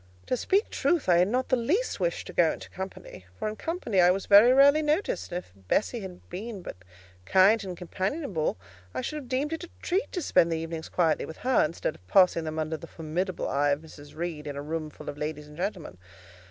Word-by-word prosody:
To - - 0
speak 390 - +1
truth, 340 - +1
I 175 -2 +5
had 180 +1 +4
not 255 +4 -1
the 255 - +4
least 320 - 0
wish - - -1
to - - -9
go - - +4
into - - -10
company, 190 - -8
for - - -2
in 215 - -3
company 280 - 0
I 175 - +6
was 190 +2 +1
very 210 +5 +8
rarely 280 +3 +6
noticed; 315 +11 -1
and 175 - -2
if 180 - -9
Bessie 95 - -1
had 190 -3 -8
but - - -29
been 200 +1 -6 0.6
kind 200 +4 +5
and 185 -2 -6
companionable, 190 - -2 0.4
I 130 - -1
should 305 - -4
have 270 -5 -8
deemed 275 +4 -1
it 325 - -4
a - - -18
treat 380 +4 0
to 360 - -2
spend 170 -10 +3
the 165 - 0
evenings 160 0 -5
quietly 165 -3 +1
with 160 - -9
her, 260 -1 +4
instead 155 0 -2
of 90 - -21
passing 180 - +4
them 155 0 -4
under 155 0 -2
the 165 - -10
formidable 175 +4 -3
eye 145 +1 +1
of 140 +1 +1
Mrs. 150 -2 -13
Reed, 160 -2 -4
in 145 - -5
a 140 - -4
room 155 +1 -3
full - - -13
of 145 - -6
ladies 150 0 -4
and 150 - -13
gentlemen. 175 - -4
180 Hz, 230 wpm, -27 LUFS, 160-255 Hz, 0.6 s, very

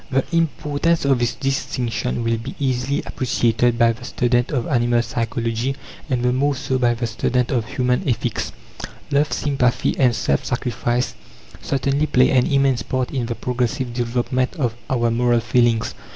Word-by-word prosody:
The 135 -1 +1
importance 165 0 +1
of 135 -3 +3
this 120 -1 0
distinction 125 -3 -2
will 115 0 +1
be 125 +4 -7
easily 130 0 -1
appreciated 120 -1 +1
by 115 -1 +5
the 120 +2 -13
student 120 0 +1
of 125 -6 -1
animal 120 -3 +2
psychology, 115 +2 -2 0.3
and 125 -2 0
the 125 0 +2
more 140 +2 +1
so 130 -1 -1
by 120 -1 +2
the 120 +1 -2
student 120 +3 0
of 120 -4 0
human 125 +6 0
ethics. 120 -1 -1 0.6
Love, 145 +1 +2
sympathy 135 -4 +1
and 125 -4 +4
self 70 -9 0
sacrifice 120 0 -1 0.5
certainly 140 +2 0
play 130 -2 +4
an 125 -2 +3
immense 135 -4 +2
part 130 +4 -2
in 125 -4 -2
the 115 - -3
progressive 125 +1 -2
development 125 +3 -1
of 125 -8 -1 0.2
our 120 -3 +1
moral 120 0 +2
feelings. 115 -1 +2
125 Hz, 160 wpm, -21 LUFS, 120-135 Hz, 0.6 s, by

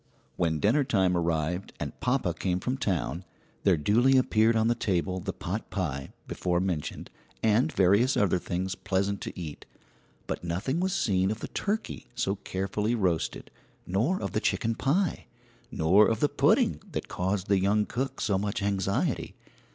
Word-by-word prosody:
When 80 -3 0
dinner 120 - +3
time 95 -8 +2
arrived 85 +2 -1
and - - -5
papa 125 -9 +1
came 90 +1 -1
from 125 +7 -1
town, 90 - -2 0.4
there 95 -4 +3
duly 120 - +4
appeared 115 -3 +3
on 110 0 +3
the 120 - +4
table 95 -4 -1
the 95 +2 -3
potpie 90 -8 -4 0.2
before 90 -1 0
mentioned, 90 -5 -3 0.3
and 115 +8 +3
various 100 +8 +3
other 95 -3 +2
things 90 +2 -2
pleasant 100 +2 -1
to - - -6
eat, 80 -4 -7 0.6
but - - -4
nothing 95 - -1
was 190 +1 0
seen 95 - +2
of 110 +1 -3
the - - -5
turkey 215 +2 -3
so 100 -4 -1
carefully 100 +5 -2
roasted 90 -7 -1 0.3
nor 120 - +1
of - - -3
the - - -1
chicken 115 -1 0
pie, 155 - 0 0.4
nor 95 +7 +4
of 110 -1 0
the 145 - +3
pudding - - +3
that - - -3
caused 95 +1 -1
the 100 -1 +3
young 105 +2 +2
cook 135 +3 -3
so 100 -3 +1
much 100 0 -2
anxiety. 100 -1 -1
100 Hz, 160 wpm, -28 LUFS, 90-115 Hz, 0.6 s, duly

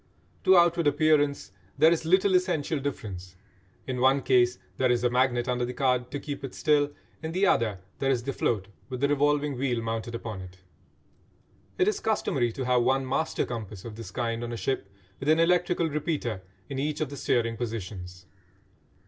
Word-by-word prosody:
To 190 0 +7
outward 170 -2 +4
appearance 145 -2 +2 0.3
there 160 +3 +6
is 165 -1 0
little 190 +3 +4
essential 175 -5 +1
difference; 95 -10 -5 0.5
in 125 -1 -3
one 135 +1 +4
case 125 -1 +3 0.2
there 130 - +2
is 120 0 +1
a 125 - +2
magnet 125 -1 +2
under 125 -1 0
the 125 +1 -3
card 125 -2 +1
to 145 - -4
keep 145 -1 -6
it 135 - -6
still, 145 -2 +2 0.3
in 160 0 -4
the 190 +3 +2
other 110 - +2 0.2
there 135 - +1
is 125 -3 +1
the 135 +2 -3
float 100 -7 -1 0.2
with 130 -1 -4
the 140 - +3
revolving 145 -1 +1
wheel 125 -3 0
mounted 115 +1 -3
upon 110 -4 -5
it. 95 0 -11 1.2
It 185 - +3
is 210 - +1
customary 135 - 0
to 130 - -4
have 125 -1 +3
one 130 +2 +1
"master 160 +5 0
compass" 110 -5 -7
of 115 -2 -7
this 115 -4 -8
kind 115 +2 -2
on 120 - -4
a 120 - -4
ship, 120 -5 -2 0.3
with 140 - -2
an 160 +1 +5
electrical 175 0 +2
repeater 150 - -2 0.3
in 135 -1 -4
each 150 +1 -1
of 150 -3 -2
the - - -5
steering 115 -3 0
positions. 95 -6 -6
130 Hz, 190 wpm, -27 LUFS, 115-150 Hz, 1.2 s, To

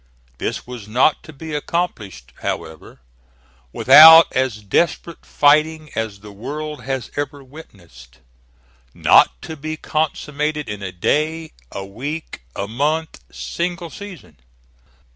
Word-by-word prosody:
This - - -4
was 120 -4 -9
not 125 +7 +2
to - - -11
be 155 +1 -9
accomplished, 115 - -4
however, 80 -5 -6 0.7
without 160 - +9
as 130 -5 -1
desperate 170 - -1
fighting 155 +1 +2
as 110 -3 -4
the 105 0 -12
world 150 +8 -6
has 135 -3 -4
ever 145 -1 -4
witnessed; 85 - -16 0.8
not - - +4
to 160 - -7
be 155 +1 -6
consummated 150 -1 -2
in 105 -1 -6
a 95 -1 -5
day, 155 - -1 0.2
a 95 - -6
week, 140 - -7
a 100 - -4
month, 150 +8 -2
single 170 - -4
season. 180 - -11
145 Hz, 120 wpm, -20 LUFS, 105-155 Hz, 0.8 s, without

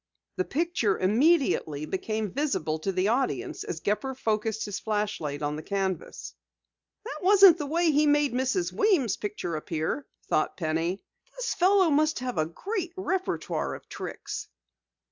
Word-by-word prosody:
The 375 - 0
picture 320 - 0
immediately 215 - +2
became 215 +4 -2
visible 210 - -1
to 195 +5 -1
the 185 +2 +1
audience 235 - -1
as 160 - -5
Gepper 260 +6 -1
focused 220 -2 -1
his 205 -2 -4
flashlight 205 -9 -2
on 145 0 -1
the - - -5
canvas. 190 - -3 0.7
"That 300 - -6
wasn't 380 -2 +7
the 295 - -3
way 335 +2 +2
he 300 +1 +3
made 290 -2 +3
Mrs. 265 +8 0
Weems' 355 - +2
picture 205 -5 -4
appear," 160 - -3 0.2
thought 155 - 0
Penny. 165 +3 -1 0.3
"The - - -4
fellow 375 -5 +3
must 310 +2 +3
have 250 -6 -3
a 155 - +1
great 365 - -4
repertoire 375 0 -2
of - - -13
tricks!" - - -6
235 Hz, 145 wpm, -27 LUFS, -, 0.7 s, wasn't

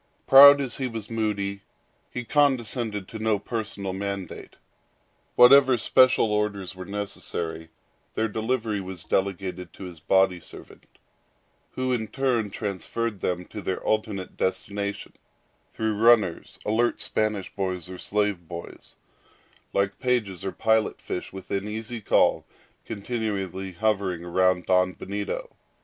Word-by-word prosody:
Proud 140 +1 +10
as 130 -4 -4
he 130 - -1
was 115 -2 -7
moody, 100 -3 -2 0.5
he 125 - -5
condescended 120 -7 +1
to 110 - -8
no 110 -1 +1
personal 100 -3 -4
mandate. 100 -1 -5 0.8
Whatever 130 +1 +7
special 130 -1 +4
orders 105 -3 -2
were 95 0 -8
necessary, 85 -5 -5 0.5
their 110 - +1
delivery 110 -1 -2
was 95 -3 -7
delegated 95 -2 -2
to - - -10
his 90 -3 -9
body 95 +2 +3
servant, 80 - -14 0.9
who 130 0 -1
in 110 -3 -1
turn 120 -2 0
transferred 105 +2 -3
them 90 0 -2
to 105 - -8
their 95 - -3
ultimate 110 -3 -1
destination, 100 +2 -3 0.6
through 110 -1 -1
runners, 110 -5 +3
alert 115 +3 +1
Spanish 105 -3 -1
boys 95 -3 -3
or 90 0 -9
slave 105 -5 -1
boys, 85 0 -9 0.8
like 100 0 0
pages 115 -8 -1
or 95 - -2
pilot 110 +1 +1
fish 90 - -5
within 95 +1 -4
easy 110 +2 -5
call - - +3 0.4
continually 100 -4 -4
hovering 95 -3 0
round 90 +1 +2
Don 90 0 +3
Benito. 100 +2 -5
105 Hz, 125 wpm, -25 LUFS, 95-115 Hz, 0.9 s, Proud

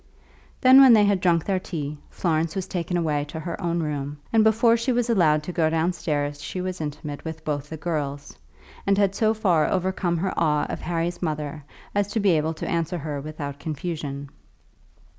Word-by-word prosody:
Then, 260 +1 +8
when 260 -3 +9
they 210 -2 +6
had 200 -2 +2
drunk 170 -3 +2
their 190 -2 +1
tea, 150 -5 -5
Florence 160 -2 -1
was 190 -2 -2
taken 175 0 -2
away 150 -4 0
to 155 +2 -7
her 170 +2 -5
own 170 -1 0
room, 145 -1 -3 0.2
and 220 -1 +5
before 230 +2 +4
she 235 +3 0
was 240 -1 +1
allowed 155 -8 +3
to 180 - -5
go 165 -3 +2
downstairs 155 -3 -1
she 165 +6 -5
was 185 -1 -4
intimate 150 -1 -5
with 160 -1 -7
both 145 -1 -3
the 160 - -6
girls, 145 -3 -4 0.5
and 200 0 +3
had 200 -2 +3
so 220 +2 +2
far 180 -8 +2
overcome 185 -2 0
her 190 +3 -1
awe 150 -2 +2
of - - -4
Harry's 170 0 -2
mother 150 -2 -3 0.3
as 205 -1 +1
to 225 - +1
be 200 -2 +3
able 160 0 +1
to - - -5
answer 170 +1 -1
her 145 -2 -4
without 145 -1 -6
confusion. 145 -3 -5
165 Hz, 195 wpm, -24 LUFS, 150-190 Hz, 0.5 s, when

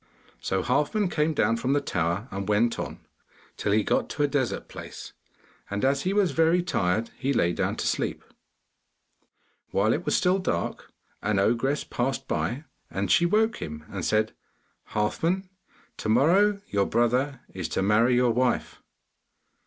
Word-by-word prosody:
So 95 -1 -1
Halfman 175 - +1
came 155 +1 +1
down 115 -2 +2
from 130 +3 0
the 145 - +3
tower, 85 -3 -1
and 100 +1 -4
went 115 +3 +2
on, - - -5 0.5
till 100 - -1
he 105 +1 +3
got - - 0
to 145 - -1
a - - +4
desert 140 -4 -1
place, - - -9 0.6
and 100 +4 -1
as 140 +1 +2
he 185 - 0
was 200 -4 +2
very 165 +4 +3
tired, 110 - 0
he 135 +1 0
lay 85 -7 +2
down - - -1
to - - -3
sleep. - - -1 1.5
While 110 +3 +2
it 170 - -2
was - - +1
still 185 +1 +2
dark, 185 - -3 0.3
an 105 -1 0
ogress 120 +8 +1
passed 135 +2 -2
by, 130 +6 -2 0.3
and 95 -1 -2
she 175 - +5
woke 220 +5 +2
him 75 0 -7
and 95 -3 -5
said, 110 +3 +1 0.6
'Halfman, 170 - 0 0.5
to - - -3
morrow 185 - +4
your 100 -1 +1
brother 125 +4 +1
is - - -4
to 95 - -1
marry 110 +5 +4
your 125 -1 +3
wife. 125 +1 0
125 Hz, 160 wpm, -26 LUFS, 105-160 Hz, 1.5 s, she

